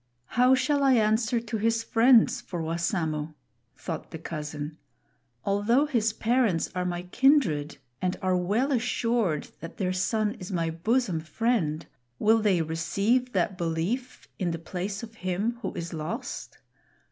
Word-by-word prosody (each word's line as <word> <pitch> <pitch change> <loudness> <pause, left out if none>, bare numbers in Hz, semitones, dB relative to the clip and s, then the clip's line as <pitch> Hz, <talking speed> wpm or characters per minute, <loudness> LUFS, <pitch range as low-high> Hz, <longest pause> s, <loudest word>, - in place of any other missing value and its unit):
"How 250 +2 +5
shall 285 +2 +1
I 270 -1 +5
answer 225 +1 +2
to 225 -1 -4
his 225 +1 +1
friends 235 +1 +5
for 175 - -6
Wassamo?" 160 -2 -2 0.4
thought - - -6
the - - -7
cousin. 150 -1 -6 0.7
"Although 205 +8 +3
his 230 -7 +1
parents 220 -6 +1
are 180 0 -1
my 175 0 -2
kindred 180 - +2 0.2
and 180 0 0
are 185 -1 +1
well 205 +10 +1
assured 230 - 0
that 165 - -9
their 185 -2 0
son 210 +3 0
is 185 +2 -7
my 165 -3 0
bosom 190 +2 0
friend, 165 -3 -1 0.3
will 220 +1 +4
they 190 -6 +3
receive 200 +11 0
that 190 - 0
belief 175 +10 -2
in 180 -3 0
the 165 - -2
place 190 +5 -5
of 225 -1 -8
him 200 +6 -1
who - - -3
is 170 0 -5
lost? 215 - -5
200 Hz, 145 wpm, -27 LUFS, 165-235 Hz, 0.7 s, How